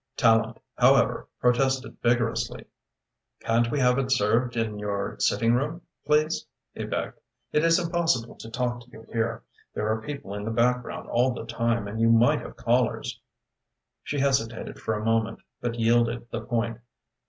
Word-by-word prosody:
Tallente, 115 0 +3 0.2
however, - - +4
protested 130 +2 +1
vigorously. 120 -1 0 0.8
"Can't 115 +1 +2
we 145 - -1
have 125 +1 +4
it 135 -1 -1
served 120 +1 +2
in 110 -2 -1
your 100 -1 -3
sitting 115 0 +2
room, 150 +7 -1 0.2
please?" 155 +2 +2 0.3
he - - -5
begged. - - -4 0.3
"It 150 - +2
is 165 0 +5
impossible 165 -9 0
to 115 - -9
talk 120 +1 -2
to 120 - -18
you 115 -2 -13
here. 115 0 -1 0.3
There 105 - -1
are 110 0 -1
people 140 -5 -6
in 105 0 -4
the 110 - -3
background 125 +2 0
all 125 +1 +2
the - - -6
time, 115 -2 -1
and 110 +2 -4
you 115 - +4
might 115 +1 +4
have - - -9
callers." - - 0 0.8
She 145 - -4
hesitated 130 -5 0
for 110 - -1
a 105 +1 -4
moment 115 0 0 0.2
but 120 -1 -2
yielded 115 0 +1
the - - -3
point. 115 -1 -2
120 Hz, 165 wpm, -26 LUFS, 115-130 Hz, 0.8 s, is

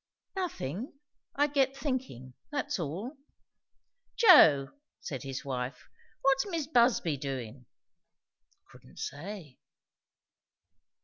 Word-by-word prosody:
"Nothing. 250 - -4 0.4
I 290 - +4
get 275 -2 +1
thinking; 255 - -4 0.2
that's 290 -8 -2
all." 190 - -5 1.0
"Joe," 160 - +7 0.3
said 135 -4 -6
his 135 +1 -6
wife, 130 0 -4 0.4
"what's 270 +5 +3
Mis' 335 -6 -2
Busby 235 - +3
doin'?" 130 -3 -6 1.0
"Couldn't 65 - -18
say." 160 -2 -7
180 Hz, 85 wpm, -30 LUFS, -, 1.0 s, Joe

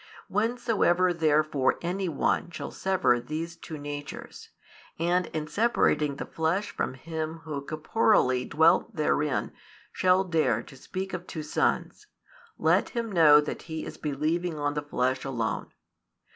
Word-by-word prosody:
Whensoever 210 -5 +2
therefore 155 -4 +2
any 180 +2 -1
one 160 +2 0
shall - - -6
sever 190 -10 +2
these 160 +6 -5
two 165 -2 -8
natures, 145 0 -7 0.5
and 175 +2 +1
in 155 -1 -4
separating 150 -6 +2
the - - -5
flesh 170 +6 -1
from - - -3
Him 160 +3 -5
Who 150 -3 -4
corporeally 155 - +2
dwelt 160 +8 +3
therein 150 -2 0 0.4
shall 185 +1 +3
dare 155 - +1
to 135 - -14
speak 190 +8 -6
of 180 0 -5
two 155 - -5
sons, 150 - -1 0.5
let - - +2
him 230 -3 -3
know 155 -5 +7
that 150 - -5
he 160 0 -4
is - - -8
believing 155 +3 -1
on 145 -1 -1
the 150 - -2
flesh 130 -3 -1
alone. 120 -6 -3
160 Hz, 140 wpm, -27 LUFS, 145-180 Hz, 0.5 s, know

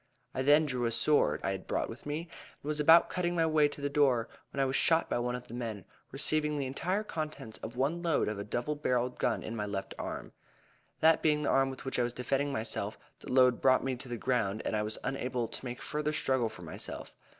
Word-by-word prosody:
I - - -1
then 145 +3 +5
drew 125 -4 -1
a 115 - +1
sword, 115 - +3
I - - 0
had 95 -1 -5
brought - - 0
with 115 +5 -9
me, 150 +2 -2
and 165 -3 -14
was 150 0 -1
about 165 +3 +7
cutting 175 -1 -1
my 165 -1 +3
way 155 -2 +4
to 145 - -9
the 145 - 0
door, 140 -5 +2 0.2
when 140 - -6
I 135 - +4
was 130 0 -1
shot 165 0 +3
by - - +1
one 125 0 -1
of 125 0 -8
the - - -10
men, 115 -6 -4 0.3
receiving 150 -1 +2
the 140 -2 -1
entire 180 +10 -1
contents 155 - -5
of 115 - -7
one 145 +7 0
load 165 -3 +1
of 105 -1 -3
a - - -3
double 120 +7 -2
barreled 125 -4 -1
gun 120 - 0
in 115 - -5
my 105 -2 -2
left 100 -1 -4
arm, - - -5 0.7
that 160 0 +5
being 150 -1 +2
the - - +1
arm 135 0 +3
with 130 0 -8
which 130 - -1
I - - +3
was 120 0 -2
defending 135 +3 -1
myself. 110 -3 -2 0.2
The - - -8
load 125 -1 +5
brought 130 -1 +4
me 135 -1 -1
to 130 0 -9
the 120 - -3
ground, 110 -4 0
and - - 0
I 105 - +1
was 105 +1 -2
unable 125 -3 -2
to - - -8
make 120 0 -6
further 150 0 -2
struggle 130 -6 +1
for 90 -5 -11
myself. 80 - -6
130 Hz, 245 wpm, -31 LUFS, 120-150 Hz, 0.7 s, about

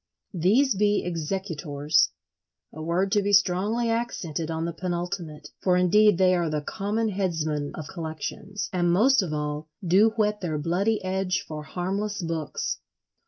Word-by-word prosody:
These 210 - +3
be 205 +1 +2
Executors—a 150 - -2
word 175 +4 0
to 205 0 +3
be 205 +1 0
strongly 205 +5 +3
accented 170 - -2
on 160 0 -2
the 170 - -3
penultimate; 175 -3 -4
for, 180 -1 +3
indeed, 205 +2 +5
they 185 0 +4
are 175 -2 +1
the 150 -1 -2
common 215 +7 -1
headsmen 160 -7 -1
of 155 - -6
collections, 165 +4 -5
and 175 -1 +2
most 240 +8 +5
of 180 -5 -3
all 150 0 -3 0.2
do 195 +6 +5
whet 210 -2 +1
their 160 -4 -2
bloody 190 +9 0
edge 185 0 -1
for 155 -1 -5
harmless 195 +6 -3
books. 165 -4 -3
180 Hz, 145 wpm, -26 LUFS, 155-200 Hz, 0.2 s, indeed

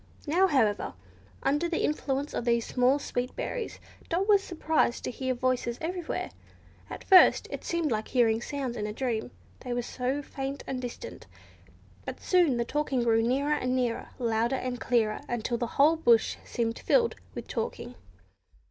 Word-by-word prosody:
Now, 350 +6 +3
however, 220 - +1 0.5
under 295 +5 +1
the 335 - -1
influence 285 -1 -1
of - - -2
these 235 -1 +1
small, 255 +2 +3
sweet 250 -3 -3
berries, 475 -3 -4 0.3
Dot 365 +4 0
was 405 -2 +5
surprised 320 -8 0
to - - -3
hear 260 0 -2
voices 245 -1 0
everywhere. 345 0 -3 0.6
At - - -7
first 375 -2 +6
it - - -5
seemed 335 -4 -1
like 215 -1 -1
hearing 230 -3 +2
sounds 265 -2 -4
in 210 -2 -3
a 210 - -4
dream, 235 -2 -2 0.3
they 250 -2 -4
were 240 0 -1
so 260 +4 -2
faint 275 0 -5
and 255 -1 -4
distant, 250 - -7 0.8
but - - -6
soon 345 -9 +3
the 235 - 0
talking 275 -2 0
grew 225 -1 +3
nearer 270 +6 +1
and 255 -3 0
nearer, 245 -3 -1
louder 235 0 +1
and 255 -1 -3
clearer, 220 -3 +1
until 240 0 -1
the 240 - -1
whole 310 +4 +5
bush 235 -8 +3
seemed 230 -1 -2
filled 470 -2 +3 0.2
with - - -6
talking. - - -4
255 Hz, 165 wpm, -28 LUFS, 235-300 Hz, 0.8 s, first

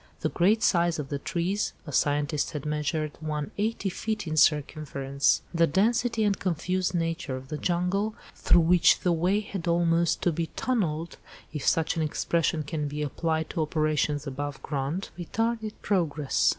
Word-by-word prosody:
The - - +1
great 210 +6 +2
size 170 -6 +3
of 145 -3 -5
the 140 - -2
trees 180 +7 -1
(a 150 - -7
scientist 145 +2 +1
had 150 -2 -5
measured 150 0 -1
one 150 -2 -3
eighty 215 -1 0
feet 215 +2 -3
in 155 -1 -3
circumference), 140 -2 +2
the 165 0 +4
density 225 - +2
and 205 -2 +1
confused 185 +1 -1
nature 165 -5 -2
of 130 +1 -11
the 150 - -3
jungle, 185 +5 0 0.2
through 175 - +4
which 170 +1 +5
the 180 - +2
way 180 +5 +2
had 195 -4 -6
almost 170 0 +2
to 175 - +3
be 165 +1 -2
tunnelled, 170 -10 -1 0.4
if 150 - -4
such 165 0 +2
an - - +1
expression 155 +1 0
can 150 0 -3
be 150 +1 -3
applied 160 +2 -1
to 165 - -1
operations 155 -1 0
above 140 +1 -5
ground, 145 +6 -3
retarded 225 +4 -2
progress. 155 -8 +1
165 Hz, 165 wpm, -27 LUFS, 150-185 Hz, 0.4 s, which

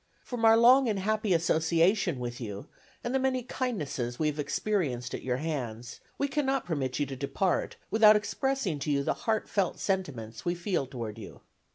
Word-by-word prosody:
From 245 -2 -5
our 225 0 +7
long 250 +2 +6
and 210 - 0
happy 215 +1 0
association 170 +1 +2
with 120 0 -5
you, 105 -3 -6 0.4
and 240 - -2
the 265 - +2
many 260 -1 0
kindnesses 150 - -3
we 155 - 0
have 150 0 -5
experienced 145 - -1
at - - -4
your 125 -1 -1
hands, 125 -6 -4 0.2
we 280 - 0
cannot 275 -1 0
permit 135 -7 -2
you 145 - +1
to 135 0 -6
depart 160 +7 -1 0.2
without 215 -1 +7
expressing 215 - -1
to 150 - -3
you 140 -1 +1
the - - +1 0.2
heartfelt 205 -3 0
sentiments 125 - -3
we 175 0 0
feel 175 -5 -1
toward 115 -5 -6
you. - - -10
170 Hz, 180 wpm, -29 LUFS, 130-220 Hz, 0.4 s, our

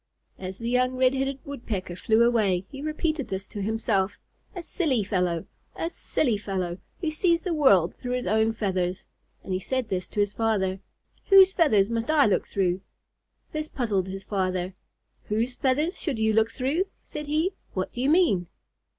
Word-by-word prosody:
As 190 0 -6
the 230 - -5
young 250 +1 +2
Red 255 0 +3
headed 270 0 -1
Woodpecker 220 - -4
flew 220 +5 +3
away, 205 -6 +2
he 275 - -7
repeated 310 -1 -1
this 190 0 -4
to 205 - -5
himself: 205 -2 0 0.4
"A 355 - -5
silly 290 - 0
fellow, 180 -4 0 0.3
a 330 - -3
silly 240 -11 0
fellow, 185 -3 -3 0.2
who 320 -3 0
sees 335 +2 +2
the 360 - -1
world 200 - +4
through 245 0 -5
his 250 - -2
own 220 +3 +2
feathers." 185 -4 -1 0.4
And 190 - -4
he 185 - 0
said 255 +3 -2
to 185 +2 -2
his 205 0 +2
father, 195 -4 0 0.5
"Whose 385 -1 +8
feathers 225 - +3
must 230 +2 -2
I 305 -3 +5
look 205 - +1
through?" 185 -1 0 0.7
This 310 0 -3
puzzled 210 -10 -1
his 195 +1 -6
father. 185 -2 -1 0.5
"Whose 230 +4 -1
feathers 295 +8 0
should 290 -8 -1
you 220 0 +2
look 220 +1 +3
through?" 275 +10 0 0.2
said 300 -1 -7
he. 310 +5 +1 0.2
"What 185 -1 -2
do 245 - -5
you 265 - +2
mean?" 305 - +3
225 Hz, 175 wpm, -26 LUFS, 190-280 Hz, 0.7 s, Whose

